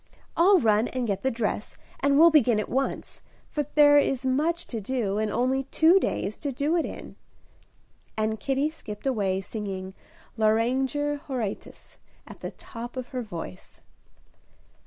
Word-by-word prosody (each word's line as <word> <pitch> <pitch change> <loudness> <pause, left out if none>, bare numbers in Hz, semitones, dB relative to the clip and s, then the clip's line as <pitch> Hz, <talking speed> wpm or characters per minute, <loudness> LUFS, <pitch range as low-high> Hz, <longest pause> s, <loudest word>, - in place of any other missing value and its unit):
I'll 375 +4 +6
run 220 -2 +3
and 255 -1 -3
get 200 -3 -2
the 265 - +1
dress, 220 -3 -3 0.2
and 280 0 +3
we'll 335 +2 +8
begin 245 -8 +4
at 215 - -3
once, 270 +2 -3 0.3
for 295 -2 -2
there 290 -1 +7
is 270 -2 0
much 310 +7 0
to 225 -3 -5
do, 210 -3 -1
and 215 0 0
only 260 +4 0
two 325 +7 +4
days 215 - -2
to 285 - -3
do 285 +6 0
it 335 - +1
in." - - -9 1.0
And 220 0 -1
Kitty 275 +3 0
skipped 210 -8 -9
away, 200 -7 0
singing 190 -2 -6 0.4
"Lauriger 260 +7 +1
Horatius," 240 -7 -6 0.3
at - - -12
the - - -5
top 240 +2 -9
of 255 -1 -5
her 255 -2 -3
voice. 170 - -9
255 Hz, 155 wpm, -26 LUFS, 215-285 Hz, 1.0 s, we'll